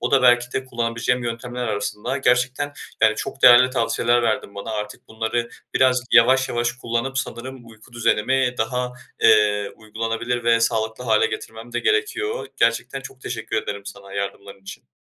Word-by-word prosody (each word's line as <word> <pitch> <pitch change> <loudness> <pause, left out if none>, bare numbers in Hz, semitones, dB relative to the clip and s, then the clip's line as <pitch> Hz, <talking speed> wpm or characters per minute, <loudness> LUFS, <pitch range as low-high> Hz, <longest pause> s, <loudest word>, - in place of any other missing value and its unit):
O 120 - -1
da 135 -2 +4
belki 120 0 +4
de 130 - -2
kullanabileceğim 120 0 -1
yöntemler 120 +1 -4
arasında. 105 +4 -3
Gerçekten, 130 +3 +1 0.3
yani, 110 0 +5
çok 135 +3 -6
değerli 125 +1 +8
tavsiyeler 120 -1 +1
verdin 110 -3 -1
bana. 100 +3 -6
Artık 105 -1 -6
bunları 115 +2 -2 0.3
biraz 130 -1 +4
yavaş 130 +3 +5
yavaş 120 0 0
kullanıp, 125 +2 -3
sanırım 130 -1 -6
uyku 110 +1 -17
düzenimi 125 +2 +1
daha, 125 +2 -1 0.3
eee, 105 -1 +7 0.3
uygulanabilir 115 +2 -3
ve 115 0 +4
sağlıklı 110 +1 -1
hale 110 -2 +3
getirmem 115 +2 -7
de 120 - -1
gerekiyor. 430 - 0
Gerçekten 115 +3 +1
çok 130 0 -11
teşekkür 115 -4 -4
ederim 100 -1 -5
sana 100 -1 -10
yardımların 100 0 -6
için. 95 - -11
120 Hz, 155 wpm, -22 LUFS, 110-125 Hz, 0.3 s, değerli